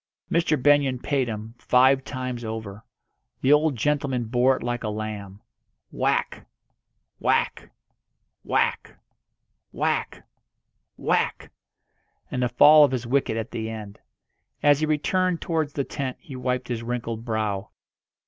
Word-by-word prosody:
Mr. 165 Hz, -2 st, +2 dB
Benyon 140 Hz, -1 st, +3 dB
paid 135 Hz, 0 st, -1 dB
him, 110 Hz, 0 st, -6 dB
five 130 Hz, +2 st, +4 dB
times 130 Hz, -3 st, -5 dB
over. 110 Hz, -2 st, -6 dB, 0.6 s
The 135 Hz, -, +5 dB
old 150 Hz, -1 st, +3 dB
gentleman 135 Hz, 0 st, 0 dB
bore 125 Hz, +3 st, +2 dB
it -, -, -8 dB
like 120 Hz, 0 st, -2 dB
a 110 Hz, -, -2 dB
lamb. 105 Hz, -2 st, -6 dB, 0.5 s
Whack -, -, -1 dB, 0.7 s
whack -, -, 0 dB, 0.7 s
whack -, -, -1 dB, 0.7 s
whack -, -, -2 dB, 0.7 s
whack! -, -, -1 dB, 0.8 s
and 125 Hz, -, -2 dB
the 125 Hz, -, +1 dB
fall 150 Hz, +5 st, +7 dB
of 145 Hz, -, +5 dB
his 125 Hz, -2 st, -2 dB
wicket 125 Hz, -2 st, 0 dB
at 115 Hz, +1 st, -4 dB
the 110 Hz, -1 st, -4 dB
end. 105 Hz, -2 st, -8 dB, 0.6 s
As 145 Hz, -1 st, +5 dB
he 155 Hz, -, 0 dB
returned 175 Hz, +4 st, +1 dB
towards 160 Hz, -3 st, -2 dB
the 140 Hz, -, -1 dB
tent 135 Hz, -2 st, -4 dB
he 145 Hz, -7 st, -10 dB
wiped 125 Hz, 0 st, -2 dB
his 120 Hz, -2 st, -2 dB
wrinkled 115 Hz, -1 st, -4 dB
brow. 110 Hz, -3 st, -2 dB
125 Hz, 130 wpm, -25 LUFS, 110-145 Hz, 0.8 s, fall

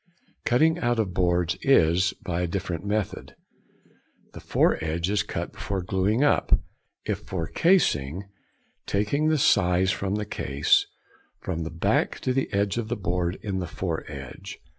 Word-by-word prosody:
"Cutting 160 Hz, +7 st, +3 dB
out 120 Hz, -4 st, +1 dB
of 105 Hz, -5 st, -1 dB
boards" 90 Hz, 0 st, +1 dB
is 90 Hz, -7 st, +3 dB
by 90 Hz, -2 st, -1 dB
a 90 Hz, -, 0 dB
different 85 Hz, -1 st, -3 dB
method. 105 Hz, -1 st, -3 dB, 1.0 s
The -, -, -8 dB
foredge 85 Hz, +4 st, +1 dB
is 105 Hz, -, +2 dB
cut -, -, -5 dB
before 95 Hz, -2 st, -3 dB
gluing 95 Hz, +7 st, +1 dB
up, 145 Hz, -, +3 dB, 0.5 s
if -, -, -1 dB
for 85 Hz, -3 st, -4 dB
casing, 95 Hz, -, +2 dB, 0.6 s
taking 105 Hz, +10 st, +1 dB
the 155 Hz, -, +3 dB
size 95 Hz, -7 st, +3 dB
from 100 Hz, +1 st, -2 dB
the 105 Hz, 0 st, -2 dB
case, 70 Hz, -7 st, +1 dB, 0.5 s
from 85 Hz, -3 st, -3 dB
the 80 Hz, -, -3 dB
back 80 Hz, 0 st, 0 dB
to 130 Hz, -, 0 dB
the 135 Hz, +1 st, -1 dB
edge 100 Hz, +2 st, 0 dB
of 115 Hz, -, -3 dB
the 120 Hz, +1 st, -2 dB
board 90 Hz, -1 st, -1 dB
in 100 Hz, -3 st, -2 dB
the 90 Hz, -, -3 dB
foredge. 75 Hz, -7 st, -6 dB
95 Hz, 150 wpm, -26 LUFS, 85-105 Hz, 1.0 s, Cutting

